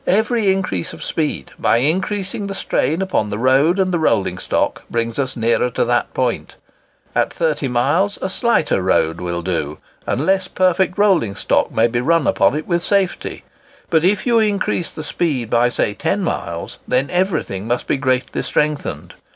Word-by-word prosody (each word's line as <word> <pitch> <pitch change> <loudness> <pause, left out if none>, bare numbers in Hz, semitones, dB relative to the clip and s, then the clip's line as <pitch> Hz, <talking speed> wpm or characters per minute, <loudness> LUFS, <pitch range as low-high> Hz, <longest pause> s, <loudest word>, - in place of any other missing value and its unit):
Every 220 +1 +2
increase 185 - -2
of - - -8
speed, 150 - -2
by - - +3
increasing 190 - -1
the 195 - -5
strain 165 -1 0
upon 185 - -1
the 105 - -3
road 135 - +3
and 190 -1 +1
the 175 - 0
rolling 95 - +1
stock, - - -1
brings 115 +1 -2
us 130 -2 -2
nearer 115 +2 +2
to - - 0
that - - 0
point. - - -1 0.6
At - - +1
30 155 -4 -1
miles 145 +12 +1
a - - -2
slighter 190 - +1
road 85 -3 +1
will 85 -1 -3
do, 75 -5 -2 0.3
and 140 - 0
less 190 0 +2
perfect 185 0 +1
rolling 185 - +2
stock - - +1
may 110 - +3
be 120 +1 0
run 165 +2 +2
upon - - +3
it 155 - -3
with 170 -1 0
safety. 195 -1 0 0.5
But 160 -2 +3
if 190 +2 +2
you 235 -2 +4
increase 205 -5 0
the 155 - -8
speed 140 -10 -2
by 120 +1 +3
say 105 - -1
10 100 - -1
miles, - - -4
then 130 +2 +1
everything 175 - -1
must 120 +1 -1
be - - 0
greatly 130 -1 0
strengthened. 150 -1 -2
150 Hz, 175 wpm, -19 LUFS, 120-190 Hz, 0.6 s, you